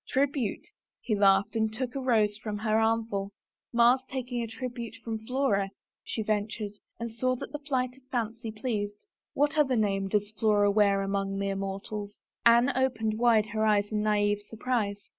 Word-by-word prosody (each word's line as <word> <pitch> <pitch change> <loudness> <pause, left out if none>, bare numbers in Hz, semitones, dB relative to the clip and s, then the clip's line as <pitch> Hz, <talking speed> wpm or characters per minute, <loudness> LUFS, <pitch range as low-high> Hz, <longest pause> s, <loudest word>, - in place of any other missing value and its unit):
Tribute," 270 -4 0 0.3
he 225 - -2
laughed 195 +1 +4
and 220 -1 +1
took 245 +2 -3
a 275 - -3
rose 220 -5 +2
from 210 0 -5
her 215 +1 +1
armful. 220 -3 0 0.4
Mars 240 +2 +5
taking 245 -3 -3
tribute 235 0 -6
from 225 -1 -3
Flora," 250 -7 +1 0.3
she 220 - -3
ventured 210 0 -2 0.3
and 235 0 -4
saw 255 +3 0
that - - -7
the 295 - -5
flight 255 -4 -1
of 265 - -21
fancy 230 -1 -2
pleased.. 215 -2 -3 0.2
" - - -65
What 295 +2 +2
other 265 -4 +3
name 195 -3 +1
does 205 +1 0
Flora 210 -2 +3
wear 200 -1 +3
among 195 0 -1
mere 195 0 -1
mortals? 200 +1 -5 0.2
" - - -48
Anne 240 +3 +5
opened 225 -4 0
wide 230 -3 +4
her 215 0 0
eyes 205 -1 +2
in 210 -1 0
naive 205 -1 +2
surprise. 220 -3 -2
220 Hz, 175 wpm, -29 LUFS, 205-245 Hz, 0.4 s, Mars